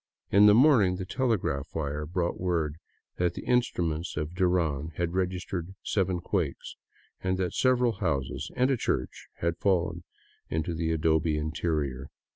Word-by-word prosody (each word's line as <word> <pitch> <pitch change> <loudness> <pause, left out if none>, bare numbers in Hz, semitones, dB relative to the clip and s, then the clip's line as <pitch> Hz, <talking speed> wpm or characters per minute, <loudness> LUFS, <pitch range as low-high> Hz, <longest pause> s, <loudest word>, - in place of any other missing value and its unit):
In 100 +2 +7
the 105 - +7
morning 115 -8 +5
the 95 0 -5
telegraph 100 - -1
wire 75 -1 -2
brought 85 +1 -1
word 80 -4 -1 0.4
that 90 -1 0
the - - -7
in 125 0 +5
struments 85 -7 -3
of 75 +2 -3
Duran 85 -5 0
had 85 -1 -1
registered 90 0 -2
seven 95 -3 0
quakes, 85 -7 -2 0.5
and 95 0 0
that 90 -2 -1
several 125 -2 +3
houses 70 -9 -2
and 130 +2 +3
a 130 - +2
church 65 - -2
had 85 0 0
fallen 85 -3 +1 0.5
in 80 0 0
the 80 0 -2
adobe 80 -1 +2
interior. 75 -4 -2
85 Hz, 150 wpm, -28 LUFS, 80-95 Hz, 0.5 s, In